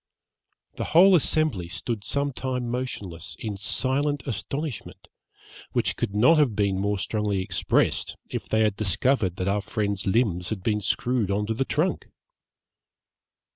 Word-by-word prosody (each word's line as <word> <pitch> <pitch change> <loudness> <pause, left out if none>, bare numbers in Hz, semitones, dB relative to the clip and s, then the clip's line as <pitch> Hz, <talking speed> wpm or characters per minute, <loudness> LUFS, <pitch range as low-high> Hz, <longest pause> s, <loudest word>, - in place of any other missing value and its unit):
The - - -2
whole 190 +2 +8
assembly 150 - +1
stood 100 +5 -4
some 140 +7 -1
time 125 -1 -3
motionless, 100 -9 -4
in 105 -3 -4
silent 135 +7 0
astonishment, 135 - -5 0.7
which - - +1
could 100 - -3
not 155 +10 +5
have 130 -8 +3
been 100 -2 +1
more 100 +1 0
strongly 105 0 -1
expressed, 95 - 0
if - - -5
they 110 - +2
had 105 -2 +3
discovered 100 0 +1
that 95 -1 -3
our 100 +1 +1
friend's 100 -2 -2
limbs 95 -4 +1
had 100 -4 -4
been 105 0 +1
screwed 120 0 0
on 100 +1 0
to 110 - -1
the 135 +4 -1
trunk. 160 +8 -1
110 Hz, 145 wpm, -25 LUFS, 100-130 Hz, 0.7 s, whole